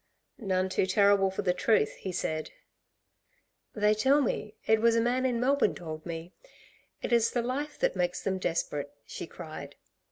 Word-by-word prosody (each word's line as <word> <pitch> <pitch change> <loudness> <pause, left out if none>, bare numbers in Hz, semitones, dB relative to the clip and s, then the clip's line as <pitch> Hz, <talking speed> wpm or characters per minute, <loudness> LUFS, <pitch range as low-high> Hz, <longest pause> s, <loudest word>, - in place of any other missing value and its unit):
"None 190 -4 0
too 185 0 0
terrible 200 0 +4
for 190 - -4
the 180 -2 +2
truth," 180 -4 +2
he 190 - -5
said. 155 -3 -2 1.3
"They 210 0 +3
tell 265 +7 +4
me 220 -5 -2
it 220 0 +3
was 230 0 +4
a - - +4
man 250 +3 +1
in 240 -2 0
Melbourne 275 +3 +2
told 155 -1 -7
me 170 +1 -6 0.7
it - - -1
is 230 -1 +4
the 240 - -1
life 280 +5 -4
makes 180 -1 -1
them 190 -1 -1
desperate," 150 -5 -2
she - - -7
cried. - - -9
205 Hz, 165 wpm, -29 LUFS, 180-235 Hz, 1.3 s, terrible